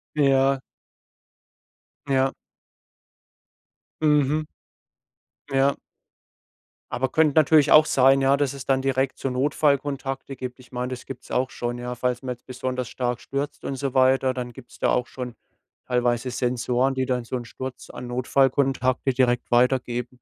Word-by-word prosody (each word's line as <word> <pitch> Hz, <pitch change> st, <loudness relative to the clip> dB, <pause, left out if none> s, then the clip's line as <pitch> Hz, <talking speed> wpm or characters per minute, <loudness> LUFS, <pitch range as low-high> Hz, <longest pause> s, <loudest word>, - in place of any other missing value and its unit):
Ja. 135 Hz, -2 st, +3 dB, 1.5 s
Ja. 135 Hz, 0 st, +2 dB, 1.7 s
Mhm. 150 Hz, 0 st, +2 dB, 1.0 s
Ja. 135 Hz, 0 st, +2 dB, 1.2 s
Aber 130 Hz, +1 st, 0 dB
könnte 155 Hz, +1 st, +3 dB
natürlich 150 Hz, -1 st, +5 dB
auch 155 Hz, +1 st, +8 dB
sein, 135 Hz, +1 st, +4 dB
ja? 135 Hz, +1 st, +4 dB
Dass 140 Hz, -1 st, 0 dB
es 140 Hz, -2 st, -9 dB
dann 135 Hz, -1 st, +2 dB
direkt 135 Hz, 0 st, 0 dB
so 135 Hz, -, -1 dB
Notfallkontakte 140 Hz, 0 st, 0 dB
gibt. 125 Hz, 0 st, -7 dB
Ich 130 Hz, 0 st, -18 dB
meine, 125 Hz, 0 st, -3 dB
das 130 Hz, -1 st, -7 dB
gibt's 130 Hz, -2 st, -9 dB
auch 130 Hz, +1 st, 0 dB
schon, 120 Hz, 0 st, -4 dB
ja? 125 Hz, 0 st, -4 dB
Falls 125 Hz, 0 st, -1 dB
man 130 Hz, -, -4 dB
jetzt 120 Hz, -, -28 dB
besonders 130 Hz, -1 st, -4 dB
stark 125 Hz, -1 st, -2 dB
stürzt 140 Hz, +3 st, -4 dB
und 135 Hz, -, -3 dB
so 135 Hz, -1 st, -3 dB
weiter, 130 Hz, 0 st, +3 dB
dann 125 Hz, -1 st, -5 dB
gibt's 125 Hz, -1 st, -14 dB
da -, -, +2 dB
auch 125 Hz, 0 st, +1 dB
schon 125 Hz, -3 st, -7 dB, 0.5 s
teilweise 125 Hz, 0 st, 0 dB
Sensoren, 125 Hz, +2 st, 0 dB
die 130 Hz, 0 st, -1 dB
dann 125 Hz, -2 st, 0 dB
so 125 Hz, -, -4 dB
'nen 120 Hz, -, -5 dB
Sturz 130 Hz, +2 st, -8 dB
an 125 Hz, -, -8 dB
Notfallkontakte 130 Hz, +1 st, +1 dB
direkt 125 Hz, -2 st, +1 dB
weitergeben. 125 Hz, 0 st, +1 dB
130 Hz, 145 wpm, -24 LUFS, 125-135 Hz, 1.7 s, auch